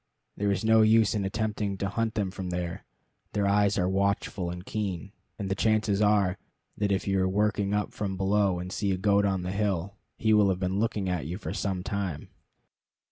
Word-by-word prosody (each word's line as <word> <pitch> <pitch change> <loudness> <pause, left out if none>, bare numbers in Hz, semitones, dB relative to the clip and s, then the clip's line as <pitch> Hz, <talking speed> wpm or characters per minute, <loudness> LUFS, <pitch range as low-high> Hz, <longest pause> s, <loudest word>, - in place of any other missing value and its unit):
There 100 0 0
is 100 +2 -1
no 110 0 +6
use 110 -1 +5
in 105 -3 -1
attempting 105 -1 -2
to 100 - -1
hunt 110 +2 -1
them 100 -3 -1
from 95 -1 -5
there. 90 -1 -4 0.5
Their 105 -1 +1
eyes 100 0 +3
are 90 -2 +2
watchful 95 -1 0
and 90 +1 -7
keen, 100 -4 -3 0.3
and 100 - -4
the 95 - 0
chances 105 0 +1
are 100 -3 +3 0.4
that 100 -1 0
if 95 +1 0
you 95 -1 +2
are 95 - +2
working 100 0 +1
up 105 -1 -2
from 95 -3 -3
below 100 -1 +2
and 90 +1 -5
see 100 0 -1
a 95 - 0
goat 100 +1 +3
on 95 -2 0
the 90 - -3
hill, 100 -2 -1 0.2
he 110 0 +2
will 105 -2 +5
have 95 -1 0
been 95 +1 -1
looking 105 -3 0
at 90 -5 -2
you 90 +3 -4
for 105 - -5
some 95 -2 -2
time. 95 -7 -3
100 Hz, 210 wpm, -28 LUFS, 95-105 Hz, 0.5 s, no